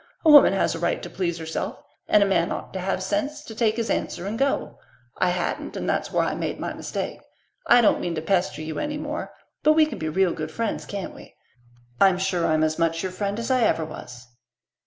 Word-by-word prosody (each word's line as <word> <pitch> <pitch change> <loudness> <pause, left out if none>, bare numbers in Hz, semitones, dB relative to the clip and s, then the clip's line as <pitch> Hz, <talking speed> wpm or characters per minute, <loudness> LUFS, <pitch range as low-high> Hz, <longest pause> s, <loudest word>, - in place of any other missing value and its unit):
A 315 - +8
woman 290 -1 +9
has 195 - +1
a 165 - -5
right 170 - 0
to - - -7
please 170 -3 -2
herself, 160 -1 -4 0.3
and 210 - +5
a - - +2
man 170 -4 +1
ought - - -5
to 190 - -3
have 185 0 -1
sense 295 +7 -2
to 225 - -9
take 220 -1 +1
his 230 -1 -2
answer 175 - -2
and 205 +3 -3
go. 275 +3 -1 0.4
I 180 - +3
hadn't, 180 0 -2
and - - -3
that's - - -1
where - - +2
I - - -1
made - - -3
my - - -3
mistake. - - -4 0.5
I 245 - +7
don't 220 - +3
mean 175 -1 -2
to 155 - -2
pester 180 -3 0
you 155 0 -4
any 295 0 -2
more, 300 0 -5 0.3
but 310 - +5
we 310 0 +5
can 295 -6 -6
be 155 - -2
real 185 +2 +2
good 155 0 -4
friends, 225 +7 -3
can't 200 -2 -5
we? - - -14 0.6
I'm 190 -2 +5
sure 185 -2 0
I'm 155 0 +2
as 155 +1 0
much 165 0 +1
your 190 - -2
friend 200 +2 -3
as 230 +3 -2
ever 230 -10 +3
I - - -3
was." 125 -6 -10
190 Hz, 235 wpm, -24 LUFS, 165-230 Hz, 0.6 s, woman